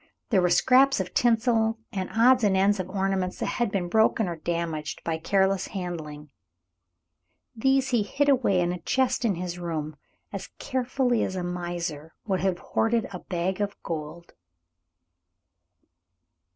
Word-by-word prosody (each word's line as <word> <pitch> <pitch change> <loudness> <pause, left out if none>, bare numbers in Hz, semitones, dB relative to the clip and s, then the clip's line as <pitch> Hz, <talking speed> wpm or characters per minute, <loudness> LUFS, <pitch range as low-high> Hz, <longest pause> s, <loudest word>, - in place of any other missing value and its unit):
There 195 -5 +4
were 180 - +2
scraps 260 +8 +4
of 185 -1 -4
tinsel 225 -1 +2
and 190 -2 -3
odds 245 +2 +4
and 195 -2 +3
ends 200 +1 +3
of 185 0 -4
ornaments 190 -1 -1
that - - -2
had 240 -4 -1
been 185 -3 -1
broken 220 +1 +2
or 170 - -3
damaged 160 -2 -3
by 160 -1 -2
careless 190 +2 +1
handling. 155 -6 -6 1.2
These 270 +3 +2
he 240 -4 +2
hid 280 +8 0
away 240 -9 +3
in 175 0 0
a 180 - -6
chest 260 +8 +1
in 205 -5 +2
his 175 0 -5
room, 155 -3 -4 0.4
as 195 -1 -5
carefully 255 -2 0
as 190 - -3
a 180 - -3
miser 175 -3 -4
would 190 -4 0
have 190 -1 0 0.2
hoarded 225 0 +2
a 180 - -5
bag 185 +2 -2
of 205 0 -2
gold. 165 +1 -6
190 Hz, 150 wpm, -26 LUFS, 175-225 Hz, 1.2 s, There